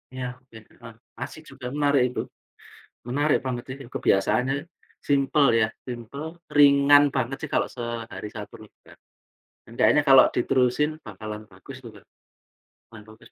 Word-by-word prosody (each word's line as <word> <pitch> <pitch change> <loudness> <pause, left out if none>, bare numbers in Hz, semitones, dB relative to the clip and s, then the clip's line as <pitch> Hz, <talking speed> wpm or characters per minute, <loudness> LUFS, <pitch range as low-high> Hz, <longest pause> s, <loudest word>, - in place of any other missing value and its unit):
Ya 125 0 -6
oke, 125 -3 -16
heeh, 115 +1 -15 0.3
asik 155 - -7
juga 130 -2 -8
menarik 145 -3 +3
itu. - - -1 0.9
Menarik 145 +4 +1
banget 120 -2 -3
sih, 130 - -6
kebiasaannya 125 +8 +1 0.5
simple 140 0 +3 0.2
ya, 110 - +3 0.2
simple, 140 +8 -7 0.2
ringan 145 0 +7
banget 130 +1 -1
sih - - -5
kalau - - +2
sehari 120 -3 -6
1 105 -2 -9
juga. - - -21 0.7
Hendaknya 120 +5 +3
kalau 135 -1 +8
diterusin 130 +4 +1
bakalan 110 0 -8
bagus 95 +8 -12
itu 120 - -10
Kak, - - -19 0.8
lumayan 115 -2 -13
bagus. 110 +1 -16
125 Hz, 135 wpm, -25 LUFS, 115-140 Hz, 0.9 s, kalau